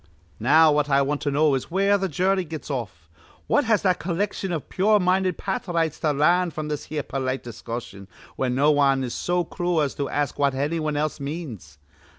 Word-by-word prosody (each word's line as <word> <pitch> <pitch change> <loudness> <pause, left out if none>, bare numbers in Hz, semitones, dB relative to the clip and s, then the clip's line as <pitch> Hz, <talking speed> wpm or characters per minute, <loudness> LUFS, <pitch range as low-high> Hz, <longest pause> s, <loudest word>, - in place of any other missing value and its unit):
"Now 155 +7 +5
what 150 0 +1
I 140 0 +4
want 145 +1 -2
to 145 - -1
know 145 +1 +3
is 135 - -2
where 195 +3 +2
th' 190 -1 -1
jury 185 +4 +1
gets 155 -2 -7
off. 100 - -5 0.4
What 290 - +2
has 220 -2 +2
that 185 -3 +2
collection 190 +2 -2
iv 160 -4 -3
pure 210 +3 +3
minded 185 -1 +1
pathrites 170 -5 -2
to 155 - +2
larn 170 +5 +3
fr'm 155 -1 -5
this 150 -1 -4
here 150 -2 -3
polite 130 -1 -3
discussion, 115 -4 -7 0.3
where 130 - -1
no 140 +4 +3
wan 135 -2 +3
is 125 - -4
so 175 0 0
crool 175 0 -1
as 145 -3 0
to 140 - -3
ask 145 -1 -2
what 140 -2 +2
anny 145 +5 -1
wan 155 -1 -2
else 155 +1 -1
means? 140 - -7
150 Hz, 200 wpm, -24 LUFS, 135-175 Hz, 0.4 s, Now